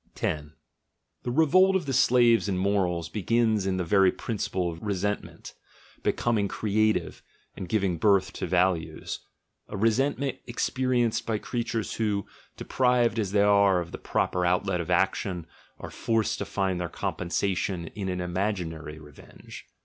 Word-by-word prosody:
10. 75 0 -3 0.7
The - - -4
revolt 175 +8 +4
of 185 -4 0
the 135 - -2
slaves 120 -3 +4
in 95 - 0
morals 90 -3 0
begins 110 +1 +1
in 95 -1 0
the 90 - 0
very 95 +1 +4
principle 95 -5 -3
of 80 0 -10
resentment 105 0 -3 0.5
becoming 110 -4 +1
creative 110 +2 0 0.3
and 90 - -7
giving 95 -5 0
birth 100 -2 +3
to - - -4
values 90 -1 0 0.3
— - - -52
a - - -6
resentment 135 +6 +1
experienced 125 -1 0
by 110 -2 0
creatures 115 -1 -3
who, 105 -3 0 0.3
deprived 125 -3 +1
as 100 -3 -1
they 100 0 +3
are 100 -2 +4
of 85 -1 -6
the - - -7
proper 90 - -1
outlet 90 +1 +1
of 85 - -7
action, 90 -1 0 0.3
are - - -8
forced 115 -1 0
to - - -2
find 95 -3 -1
their 85 - -3
compensation 90 +1 -2
in 95 -1 -5
an 90 0 -2
imaginary 90 -4 -3
revenge. 75 -2 -13
100 Hz, 150 wpm, -27 LUFS, 90-115 Hz, 0.7 s, revolt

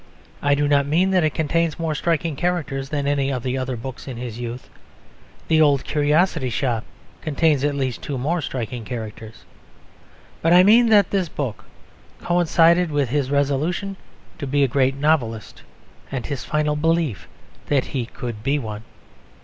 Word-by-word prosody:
I 145 0 +3
do 145 0 +1
not 140 -1 +3
mean 175 +6 +2
that 185 -3 +3
it 155 -2 0
contains 165 0 0
more 165 -2 -1
striking 165 0 -1
characters 140 -5 -2
than 145 -1 -2
any 140 -1 +1
of 125 -3 -3
the 130 0 -1
other 130 -1 -2
books 130 +3 -8
in 130 -3 -6
his 120 -1 -6
youth. 120 +1 -6 0.8
The 160 -1 +4
Old 145 -3 +4
Curiosity 150 -1 +1
Shop 120 -1 -1 0.4
contains 155 -2 +1
at 145 -1 +1
least 130 -4 -2
two 140 - -4
more 160 +7 -1
striking 125 -3 -4
characters. 110 -2 -7 1.0
But 165 +1 +3
I 180 +1 +8
mean 230 +4 +6
that 205 -3 +5
this 190 -4 0
book 130 -9 -5 0.5
coincided 175 0 +3
with 145 -4 0
his 140 0 0
resolution 145 +8 0 0.4
to 140 - -4
be 140 +1 +2
a - - +4
great 135 +1 +1
novelist 140 -7 -1 0.5
and 135 -3 -3
his 140 -4 -4
final 150 -1 0
belief 160 - 0 0.4
that 140 -3 +2
he 125 -4 -3
could 120 -3 -6
be 140 +6 +1
one. 110 -5 -5
145 Hz, 165 wpm, -22 LUFS, 130-160 Hz, 1.0 s, I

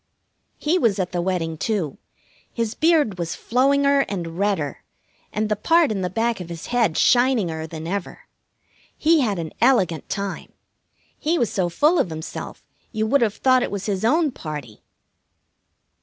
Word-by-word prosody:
He 335 +5 +1
was 220 - +2
at 185 -2 -2
the 175 -1 -1
wedding, 170 -3 -2
too. 180 -6 -2 0.5
His 230 -2 -2
beard 305 - +2
was 170 -1 -3
flowinger 280 +3 +2
and 170 -3 -5
redder, 195 -9 -1 0.5
and 215 0 -1
the 210 - 0
part 330 +5 +3
in 200 -3 -2
the 180 - -1
back 230 +3 -1
of 175 -2 -7
his 170 -1 -7
head 230 -10 +2
shininger 215 -11 +2
than 160 0 -7
ever. 195 +2 -4 0.8
He 320 +1 +4
had 215 -8 0
an 165 -2 -5
elegant 185 - +2
time. 200 -1 -4 0.7
He 325 +3 +1
was 235 - 0
so 180 -3 0
full 300 - +3
of - - +1
himself 160 0 -7 0.3
you 220 -2 -1
would 270 +5 +2
have 215 -3 +1
thought 255 -1 +3
it - - -1
was 200 -1 -4
his 200 -2 -2
own 300 +6 +3
party. 150 - -8
205 Hz, 165 wpm, -22 LUFS, 170-255 Hz, 0.8 s, He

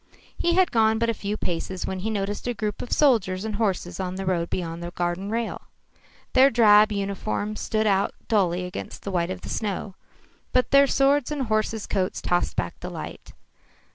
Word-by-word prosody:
He 345 0 +1
had 370 -1 +4
gone 220 -1 +3
but 230 +1 +1
a - - -3
few 205 0 -4
paces 180 +1 -3
when 190 - -3
he 210 +4 -2
noticed 205 +1 -3
a 245 - -1
group 210 -2 -3
of 245 - -7
soldiers 215 -9 +2
and 215 -2 -3
horses 190 -5 -1
on 185 -1 -3
the 195 0 -4
road 170 -2 0
beyond 170 -2 -4
the 170 - -4
garden 175 +2 -2
rail. 230 +1 -3 0.7
Their 265 +1 +7
drab 215 -3 +6
uniforms 200 - -3
stood 220 0 0
out 195 -1 +2
dully 180 -5 +1
against 180 - -7
the 200 - -4
white 175 -1 0
of 185 0 -5
the - - -8
snow, 200 -2 -3 0.6
but 255 0 +2
their 280 0 +7
swords 275 0 +3
and 290 -3 -1
horses' 215 -1 -1
coats 185 -2 -1
tossed 175 0 0
back - - -3
the - - -6
light. - - -8
205 Hz, 195 wpm, -25 LUFS, 185-225 Hz, 0.7 s, Their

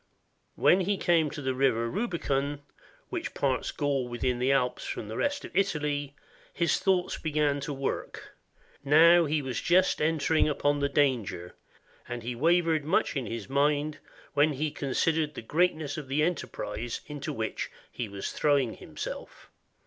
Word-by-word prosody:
When 185 - +5
he 195 +2 0
came 165 -4 +3
to 145 0 -7
the 130 0 0
river 130 -3 +2
Rubicon, 145 - -2 0.5
which - - -4
parts - - 0
Gaul 140 -3 -1
within 120 +1 -1
the 130 +2 +2
Alps 125 -2 +1
from 105 - -5
the 110 - -5
rest 285 - -1
of - - -12
Italy, 150 -7 0 0.4
his 170 0 +2
thoughts 185 -2 +1
began 150 -2 +1
to 140 - -4
work, 135 -1 -4 0.5
now 165 +4 +6
he 150 -1 0
was 130 -3 -3
just 180 -1 +3
entering 160 0 +2
upon 145 0 +1
the 140 0 +1
danger, 110 -12 0 0.6
and 120 -1 -5
he 120 +2 -3
wavered 165 +3 +2
much 155 +1 +1
in 130 -5 -2
his 115 -2 -5
mind, 145 +2 +1 0.3
when 150 +1 +3
he 150 +2 -2
considered 150 +3 0
the - - -6
greatness 155 +1 0
of 150 -3 -6
the 140 +3 +1
enterprise 120 -8 -3
into 145 -1 -5
which 110 0 -3 0.2
he 115 -4 -4
was 100 0 -5
throwing 140 -6 +2
himself. - - -8
145 Hz, 155 wpm, -28 LUFS, 130-160 Hz, 0.6 s, now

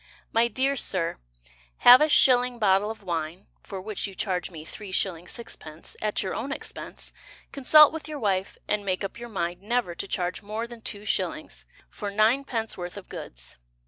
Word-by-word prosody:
My 230 +1 +4
dear 265 +4 +1
Sir, 180 -9 0 0.7
Have 250 +2 +11
a 305 - +4
shilling 250 -4 +5
bottle 205 -1 +3
of 220 -2 -7
wine 170 0 -3 0.2
(For 195 - -7
which 210 +2 -3
you 195 - -10
charge 185 -2 -1
me 160 -4 -10
3s. 195 +1 -3 0.3
6d.) 160 -9 -7
At 215 -1 0
your 190 - -3
own 265 +5 -4
expense, - - -6 0.4
Consult 300 +3 +7
with 320 -1 -6
your 305 -1 -5
wife, 195 -6 -1
And 210 -1 0
make 185 0 -1
up 195 +4 -5
your 240 0 -7
mind 175 -3 -3
Never 230 -3 0
to 185 - -5
charge 180 -1 -2
More 215 +3 -4
than 235 -1 -11
2s. 210 -1 -3 0.3
For 205 - -4
9d. 225 +2 +1
worth 175 +1 -6
of 200 - -10
goods. - - -9
210 Hz, 175 wpm, -26 LUFS, 185-240 Hz, 0.7 s, Have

